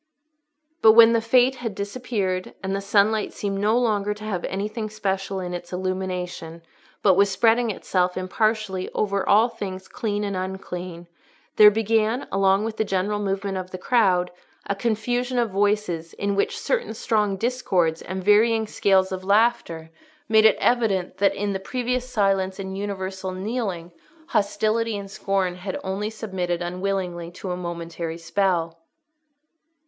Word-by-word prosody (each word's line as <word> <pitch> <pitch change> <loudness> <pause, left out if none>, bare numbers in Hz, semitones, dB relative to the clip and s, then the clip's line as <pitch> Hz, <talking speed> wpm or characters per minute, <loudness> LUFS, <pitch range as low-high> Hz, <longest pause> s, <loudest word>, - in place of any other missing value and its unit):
But 220 - +8
when 230 0 +8
the 230 - +2
Frate 250 +3 +3
had 230 -5 -5
disappeared, 200 -3 -3
and 190 0 -1
the 195 - -2
sunlight 205 +2 +2
seemed 195 -1 -3
no 215 +3 +2
longer 210 -4 +1
to 210 - -11
have 195 -5 -3
anything 215 +3 -3
special 195 -2 -2
in 180 -1 -5
its 175 0 -7
illumination, 180 -3 -4 0.4
but 195 - +6
was 200 +2 +4
spreading 230 +4 +3
itself 180 -3 -1
impartially 195 0 -1
over 200 -2 0
all 215 +3 +6
things 195 -5 -7
clean 210 -2 -3
and 200 -1 -2
unclean, 180 -2 -6 0.5
there 210 -1 +10
began, 225 +3 0
along 195 +1 +3
with 225 -1 -4
the - - +2
general 200 +1 -1
movement 195 -1 -2
of 185 0 -7
the 185 - -6
crowd, 185 -4 +2 0.3
a - - -1
confusion 245 +4 -1
of 235 -3 +1
voices 195 -5 0
in 200 0 -2
which 200 - 0
certain 475 - -2
strong 210 -3 0
discords 185 -8 0
and 185 +1 -5
varying 220 +3 +4
scales 190 -2 +2
of 185 0 -4
laughter 200 -6 +1 0.4
made 220 -1 +5
it 220 - +6
evident 215 -7 +1
that, 200 - +2
in 205 0 -2
the 190 - -2
previous 250 +4 -2
silence 195 -4 +1
and 190 -1 -5
universal 190 -1 -4
kneeling, 190 -4 -3 0.4
hostility 215 +2 0
and 195 -1 -8
scorn 190 -3 -1
had 185 +1 -5
only 195 +3 -2
submitted 190 -6 -3
unwillingly 180 -1 -3
to 180 +1 -7
a - - -1
momentary 170 -1 -5
spell. 170 -1 -1
200 Hz, 155 wpm, -24 LUFS, 185-220 Hz, 0.5 s, there